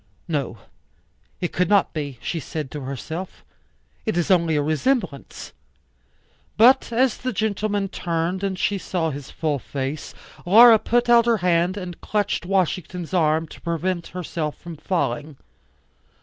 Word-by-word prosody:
No. 145 -8 -2 0.8
It 175 - -2
could 180 -1 +1
not 200 -2 +3
be, 145 -5 -4
she 170 - -2
said 150 -2 -5
to 150 - -6
herself. 160 +7 -6 0.6
It 220 -5 -1
is 175 +2 +1
only 170 -3 +3
a 145 - +2
resemblance. 155 - -2 1.0
But 240 +3 +5
as 245 +1 +2
the 255 - -3
gentleman 205 -1 -1
turned 175 +1 -2
and 195 -1 -1
she 200 +2 0
saw 165 -4 -2
his 140 -1 -8
full 150 -3 -2
face, 140 +3 -5 0.3
Laura 225 +4 +8
put 240 +2 +1
out 235 -1 +5
her 230 -1 +4
hand 175 +2 +2
and 180 -3 -7
clutched 205 -4 -1
Washington's 180 -2 -1
arm 160 -2 +2
to - - -13
prevent 170 +1 -2
herself 165 -4 -4
from 170 -1 -9
falling. 150 -3 -2
175 Hz, 145 wpm, -23 LUFS, 155-200 Hz, 1.0 s, Laura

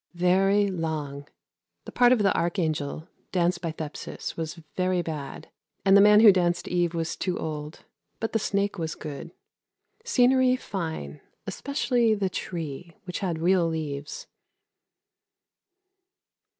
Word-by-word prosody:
Very 195 +3 +3
long. 155 -5 -4 0.6
The - - -8
part 245 0 +5
of 240 -5 +4
the 195 - +3
Archangel, 160 -3 -1 0.2
danced 175 -1 +1
by 165 -3 -2
Thepsis, 155 -1 -6
was 160 0 -4 0.2
very 185 -1 +1
bad, 150 -5 -6 0.4
and 195 0 +6
the 200 - +8
man 210 +1 +7
who 220 -2 +10
danced 175 -2 0
Eve 175 -1 0
was 165 -1 -2
too 180 -2 -2
old; 150 0 -6 0.3
but 225 - -3
the 225 - +2
snake 200 -2 -1
was 160 -1 -3
good. 150 0 -7 0.7
Scenery 255 - +4
fine, 160 - -5 0.2
especially 245 -5 +1
the 195 -2 -1
tree 165 -1 -6
(which 180 -2 -5
had 175 -4 -2
real 175 +1 +3
leaves). 150 -3 -4
175 Hz, 130 wpm, -26 LUFS, 160-200 Hz, 0.7 s, who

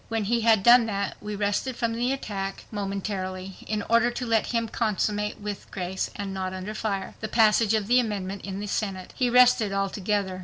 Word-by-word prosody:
When 225 -1 -1
he 235 +3 +1
had 220 -3 +4
done 240 0 +7
that 200 -2 -2
we 210 0 -5
rested 205 +5 -1
from 230 -1 -1
the 240 +3 0
attack 195 -7 -4
momentarily, 195 -2 -4
in 210 -1 -1
order 230 +1 +4
to 245 +1 -4
let 225 -2 +2
him 230 -1 0
consummate 210 -2 -1
with 205 -1 -6
grace, 190 0 -3
and 200 -1 -4
not 190 -1 -3
under 190 +3 -5
fire, 210 -3 -3
the 215 - -3
passage 220 -1 +4
of 215 -2 0
the 245 +4 +4
amendment 200 -4 -3
in 195 0 -5
the 205 - -4
Senate. 195 -3 -3
He 250 -2 +1
rested 245 -4 +5
altogether. 195 -1 -1
210 Hz, 195 wpm, -26 LUFS, 195-230 Hz, -, done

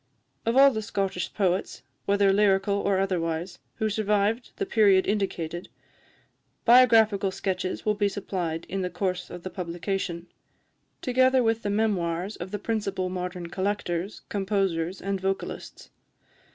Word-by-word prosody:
Of 230 +3 +2
all 275 0 +8
the 220 -3 -3
Scottish 195 -4 -2
poets, 190 -2 -1 0.2
whether 200 -1 +4
lyrical 200 -1 +3
or 200 -1 +1
otherwise, 175 -2 -1 0.2
who 220 - 0
survived 210 +2 0
the 400 - -2
period 205 - +4
indicated, 180 -4 -2 1.0
biographical 225 -5 +6
sketches 185 -1 -3
will 215 - +3
be 205 -1 +1
supplied 180 -5 -3
in 195 +1 -3
the 180 - -1
course 180 0 -2
of 175 -1 -9
the 185 - -5
publication, 175 -1 -3 0.8
together 255 0 +3
with 225 0 +1
memoirs 200 -3 0
of 175 - -7
the 205 - -3
principal 195 -4 -2
modern 180 -1 -4
collectors, 190 -1 -2
composers 195 -3 -1
and 195 0 -2
vocalists. 195 0 -4
195 Hz, 130 wpm, -26 LUFS, 180-210 Hz, 1.0 s, all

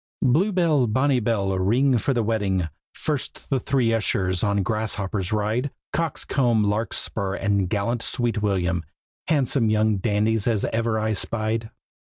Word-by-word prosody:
Blue 165 +12 +3
bell, 160 -9 +2
bonny 130 +4 +2
bell, 105 -4 0
ring 120 +7 +3
for 135 - 0
the 120 -3 +1
wedding! 100 -6 0 0.2
First 150 -2 -4
the 135 - +2
three 125 -4 +1
ushers 95 -4 0
on 100 -1 +1
grasshoppers 100 -2 -2
ride; 110 +6 0 0.2
Coxcomb, 125 -8 +1
Larkspur, 105 -1 -1
and 100 -2 0
gallant 115 +4 -1
Sweet 120 -4 -1
William, 90 -4 0 0.4
Handsome 135 -6 +1
young 110 -1 +2
dandies 105 +2 +1
as 110 -4 +1
ever 115 -1 0
I 110 0 0
spied. 110 +2 -1
110 Hz, 140 wpm, -24 LUFS, 100-125 Hz, 0.4 s, Blue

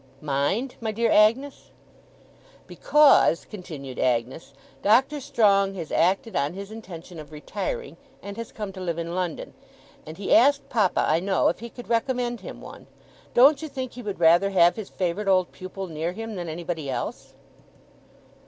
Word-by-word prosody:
'Mind, 150 - -1
my 220 -1 -2
dear 230 +2 0
Agnes?' 235 +7 +2 1.0
'Because,' 295 - +4
continued 150 -10 -9
Agnes, 125 +5 -1 0.3
'Doctor 265 +8 +3
Strong 200 -6 +2
has 165 -5 -6
acted 190 +6 +1
on 145 +3 0
his 200 +2 -8
intention 180 -6 -10
of 150 0 -11
retiring, 210 - -5 0.3
and 200 0 -7
has 230 +1 -7
come 210 -3 -6
to 185 - -8
live 170 -3 -3
in 170 0 -4
London; 180 -2 -4 0.5
and 155 +1 -10
he 200 - 0
asked 280 +5 +4
papa, 210 -7 +2
I 160 - +3
know, 190 +1 +2
if - - -3
he 235 +2 -8
could 245 +1 -11
recommend 240 0 -1
him - - -9
one. - - -12 0.5
Don't 275 +4 +6
you 315 - -4
think 260 -3 -5
he 245 - -9
would 205 -5 -5
rather 170 +4 +5
have 175 -3 +4
his 215 -3 -7
favourite 185 +2 -2
old 185 -2 +3
pupil 185 +1 -7
near 165 0 -4
him, 225 +2 -6
than 175 -4 -5
anybody 160 -2 -5
else? 130 - -5
195 Hz, 165 wpm, -25 LUFS, 170-230 Hz, 1.0 s, Don't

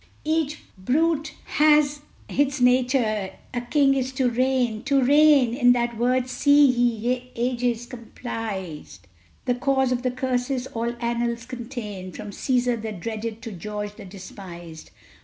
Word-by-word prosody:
Each 310 -1 0 0.2
brute 305 - 0
hath 295 -1 +3 0.3
its 285 0 0
nature; 245 -6 +2 0.2
a 245 - -1
king's 275 +1 +2
is - - -6
to 255 -2 +1
reign, 250 -3 +1
To 275 0 +3
reign! 285 -3 +5
in 245 -1 +5
that 240 -1 -1
word 250 +2 +1
see, 285 +3 +5
ye 245 0 +1
ages, 240 -1 -1
comprised 215 - -7 0.4
The 250 - +2
cause 265 +1 +1
of 250 -1 0
the 255 - 0
curses 255 0 -1
all 235 -1 -3
annals 235 0 -2
contain, 230 -7 -7
From 210 -1 -7
Cæsar 245 0 0
the 220 0 -4
dreaded 220 +3 -5
to 230 - -6
George 210 +2 -6
the 210 - -11
despised! 180 -4 -10
245 Hz, 140 wpm, -24 LUFS, 225-265 Hz, 0.4 s, reign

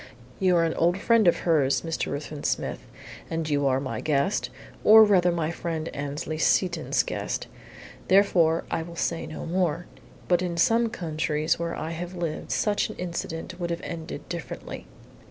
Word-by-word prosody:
You 185 -2 +3
are 170 - +4
an 165 -1 +1
old 175 +2 +2
friend 220 0 +3
of 175 - +3
hers, 150 -5 +3
Mr. 165 -1 -2
Ruthven 145 0 -5
Smith, - - -1 0.5
and 165 -1 -2
you 145 -2 +1
are 130 0 +2
my 135 - -4
guest 155 +5 0 0.3
or 220 +1 +9
rather 185 -4 +4
my 165 -2 -1
friend 165 -1 -4
Annesley 145 +2 -4
Seton's 180 +2 +2
guest - - -3 0.6
therefore 175 -4 +4
I - - 0
will 170 +1 -8
say 170 0 -2
no 155 - -7
more. 175 -1 0 0.4
But 175 -1 +3
in 175 -2 -2
some 230 +6 +3
countries 155 -2 -1
where 170 0 -2
I 160 - -4
have 175 +2 -5
lived 170 -3 -4
such 210 0 +1
an 215 - -7
incident 175 0 -5
would 175 -1 -2
have 170 0 -3
ended 165 -1 -6
differently." 170 -7 -7
170 Hz, 170 wpm, -26 LUFS, 155-180 Hz, 0.6 s, or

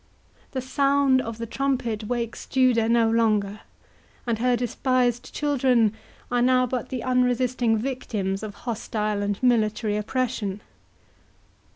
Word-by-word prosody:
The 260 - -2
sound 275 0 +2
of 230 -2 -6
the 230 - -4
trumpet 240 -3 -2
wakes 235 0 -4
Judah 250 -4 +3
no 230 -1 +4
longer, 215 -3 +1 0.7
and 230 -3 -1
her 250 +1 +2
despised 245 0 0
children 255 -7 +2 0.4
are 245 0 +2
now 255 +1 +4
but 250 0 -3
the 255 -3 -4
unresisting 250 -2 +1
victims 215 -6 -3
of 210 -2 -7
hostile 215 -3 -2
and 205 0 -1
military 215 -3 +2
oppression. 210 -3 -2
235 Hz, 120 wpm, -24 LUFS, 215-255 Hz, 0.7 s, no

